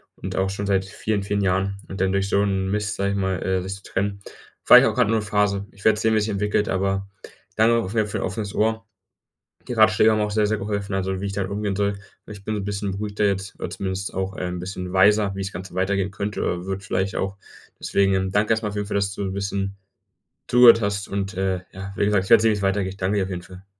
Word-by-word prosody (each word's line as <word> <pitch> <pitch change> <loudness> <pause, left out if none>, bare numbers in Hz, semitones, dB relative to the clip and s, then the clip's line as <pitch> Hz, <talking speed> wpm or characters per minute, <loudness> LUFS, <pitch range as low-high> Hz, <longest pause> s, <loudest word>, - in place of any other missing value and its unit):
und 95 0 -6
auch 95 0 +1
schon 100 +1 -4
seit 95 -1 +1
vielen, 100 +1 -2
vielen 100 0 -1
Jahren, 95 +1 0
und 95 0 -6
dann 95 0 +2
durch 100 0 0
so 100 - +3
'n 95 -1 0
Mist, 105 +1 -1
sage 100 0 0
ich - - -1
mal, 95 -1 -1
äh, 95 -1 0
sich 95 +1 -5
zu 100 - -14
trennen. 100 +1 -2 0.4
Vielleicht 125 +2 +9
auch - - +1
grad 125 -4 +3
nur 115 - +2
'ne - - -3
Phase. 100 -1 0
Ich 100 - -17
werde 110 -1 +4
sehen, 110 - +2
wie - - +3
es 105 - +1
sich 110 - -2
entwickelt, 105 +1 0
aber 95 +1 -1 0.5
danke 115 +2 +4
auf 110 -3 -2
jeden 110 -2 +2
Fall - - -8
für - - -2
dein - - -1
offenes 100 +1 -5
Ohr. 110 +1 0 0.8
Die - - -4
Ratschläge 110 -1 +5
haben 110 - +1
auch 105 - 0
sehr, 105 0 +2
sehr 110 0 0
geholfen, 100 -1 -3
also, 95 0 -1
wie - - -2
ich 100 - -3
damit 95 -1 -3
umgehen 100 -1 -2
soll. 100 0 0 0.3
Ich 100 -2 -10
bin 110 - -2
so 105 - -2
'n - - -5
bisschen 100 0 -2
beruhigter 105 +1 -2
jetzt 100 0 -1
oder - - -4
zumindest 95 0 -4
auch, 95 +1 -3
äh, - - -5
ein 90 0 -3
bisschen 90 0 -6
weiser, 100 +1 +4
wie 95 - -5
das 95 0 -4
Ganze 90 0 -8
weitergehen 95 +1 0
könnte 100 +2 -4
oder 90 +1 -2
wird 95 +1 -3
vielleicht 95 -1 -2
auch. 95 +1 -3 0.4
Deswegen 95 -1 +1
danke 105 +3 +2
erst 110 0 0
mal 105 - -1
auf 105 - -6
jeden 105 -1 -2
Fall, 100 - -2
dass 100 0 0
du 100 - -5
'n 95 -1 -2
bisschen 100 0 -3 0.7
zugehört 120 -1 +8
hast 100 -1 -2
und, 100 -1 -3
äh, 95 -1 -1
ja, 95 +1 -7
wie - - +1
gesagt, 100 -2 +2
ich - - -9
werde - - +8
sehen, 115 - +4
wie - - +2
es 100 - -5
weitergeht. 95 -1 0
Ich 95 - -14
danke 95 +2 0
dir 95 - +1
auf 95 - -6
jeden 90 -2 -4
Fall. 95 +2 -14
100 Hz, 270 wpm, -23 LUFS, 95-105 Hz, 0.8 s, Vielleicht